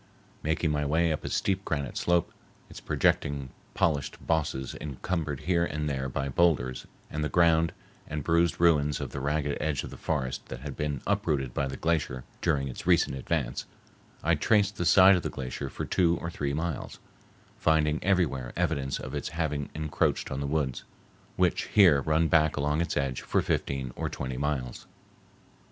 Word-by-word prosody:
Making 80 +1 0
my 75 0 0
way 80 +3 +2
up 75 - -5
a - - -3
steep 95 0 0
granite 70 -7 -3
slope, 85 -1 +1 0.4
its - - -9
projecting 70 -2 0 0.2
polished 75 -5 0
bosses 75 -5 -1
encumbered 75 0 -3
here 85 0 +2
and 75 -3 -2
there 65 -2 -2
by 70 +1 -2
boulders 65 -4 +1 0.2
and 75 0 -2
the 75 - -1
ground 85 -1 +4 0.4
and 75 -1 -4
bruised 85 +2 +2
ruins 75 -4 +3
of - - -5
the 70 - -4
ragged 75 +1 -1
edge 75 -3 -1
of - - -7
the - - -9
forest 65 -5 -2
that - - -7
had 70 0 -6
been 75 -3 -2
uprooted 65 -4 0
by 70 - 0
the 65 0 -6
glacier 75 -6 -1 0.2
during 70 -1 +1
its 65 - -7
recent - - +3
advance, 65 -2 -2 0.6
I - - +3
traced 105 -2 +2
the 85 - -1
side 95 +3 +7
of 90 - 0
the - - -3
glacier 65 +1 -5
for - - -5
two 85 -2 +2
or 85 - -4
three 70 -3 -2
miles, 80 -2 -3 0.6
finding 80 -1 +2
everywhere 85 -10 +1
evidence 70 -1 -1
of 65 - -7
its 75 - -3
having 75 -3 -2
encroached 80 0 0
on 65 - -2
the 70 - -2
woods, 70 -3 -1 0.5
which - - +1
here 85 -9 +5
run 80 +3 +2
back 80 -2 +3
along 75 +2 +1
its 85 - -1
edge 70 -3 -1
for - - 0
fifteen 65 -2 -1
or - - -2
twenty 65 -1 -4
miles. 70 -3 -3
75 Hz, 175 wpm, -28 LUFS, 70-80 Hz, 0.6 s, side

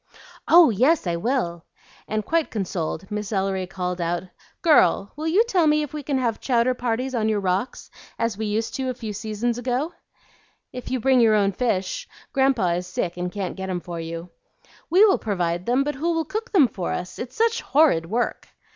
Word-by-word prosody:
"Oh 335 -6 +7
yes, 260 - +3
I 170 -1 0
will!" 170 -6 -1 0.4
and, 215 0 -2
quite 330 -1 +1
consoled, 190 -2 -4
Miss 210 0 -4
Ellery 190 -2 -1
called 180 -1 -3
out, 170 +1 -1 0.4
"Girl, 200 - +4
will 310 +2 -4
you 375 +8 +4
tell 370 -9 +2
me 300 0 +3
if 295 - -7
we 300 - -4
can 280 -1 -1
have 235 -4 -1
chowder 250 -1 +2
parties 250 +1 -2
on 220 -3 +1
your 215 -1 +1
rocks 190 +5 -2 0.3
as 230 -2 -1
we 220 +1 -3
used 220 +2 -1
to 265 -1 -2
a 255 - -3
few 220 -3 -6
seasons 220 +3 -2
ago?" 255 +7 -1 0.8
"If 250 -1 -7
you 260 - -1
bring 260 +2 +3
your 220 -2 +5
own 200 -1 +3
fish. 225 - -2 0.3
Grandpa 265 -9 +2
is 175 +1 -2
sick 180 -1 -3
and 180 0 -3
can't 195 -1 -4
get 190 0 -5
'em 180 -1 -1
for 170 -1 -7
you." 165 +1 -6 0.6
"We 370 +6 +6
will 395 - +3
provide 175 -4 -2
them, 250 +3 +3
but 295 +1 -2
who 320 +5 -1
will 325 -1 0
cook 435 +4 -5
them 320 - +5
for 190 -5 -4
us? 180 0 -5
It's 245 +1 -6
such 460 +1 +1
horrid 275 - +3
work." 235 +3 -2
225 Hz, 200 wpm, -23 LUFS, 185-275 Hz, 0.8 s, Oh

